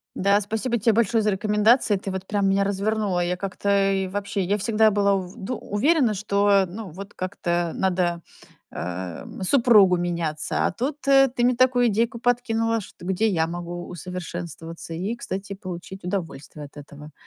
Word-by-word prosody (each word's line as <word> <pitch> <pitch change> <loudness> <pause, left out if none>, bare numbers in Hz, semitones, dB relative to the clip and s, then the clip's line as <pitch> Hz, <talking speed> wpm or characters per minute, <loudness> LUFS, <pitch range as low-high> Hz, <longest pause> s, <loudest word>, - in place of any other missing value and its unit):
Да, 200 +2 +3
спасибо 220 +4 -2
те 225 0 +2
большое 225 0 +2
за 210 - +1
рекомендации. 210 +2 +3
Ты 195 - -6
вот 190 0 -4
прям 200 -1 0
меня 195 +1 +2
развернула. 200 -1 0
Я 175 +1 0
как-то, 195 +1 0
и 190 -1 0
вообще, 200 0 -3
я 200 +4 0
всегда 220 +1 +3
была 200 -1 +2
ув 185 -1 -5
дум 220 +4 -5
уверена, 255 +2 +2
что, 200 -1 +2
ну, 205 +1 -7
вот 195 +5 -10
как-то 175 -3 -2
надо, 180 -2 0 0.5
э, 90 0 -5 0.2
супругу 210 -6 +5
меняться. 170 -3 -2
А - - +1
тут 275 +9 -4
ты 270 -2 +4
мне 250 0 +3
такую 250 -1 +4
идейку 230 +2 0
подкинула, 230 -2 +1
что 180 -3 -12
где 190 +4 +1
я 165 -6 +1
могу 175 +1 -6
усовершенствоваться 170 -2 -7
и, 190 +8 -3
кстати, 195 -2 -6
получить 185 0 -8
удовольствие 165 -5 -5
от 145 - -15
этого 145 +1 -11
195 Hz, 165 wpm, -24 LUFS, 175-220 Hz, 0.5 s, супругу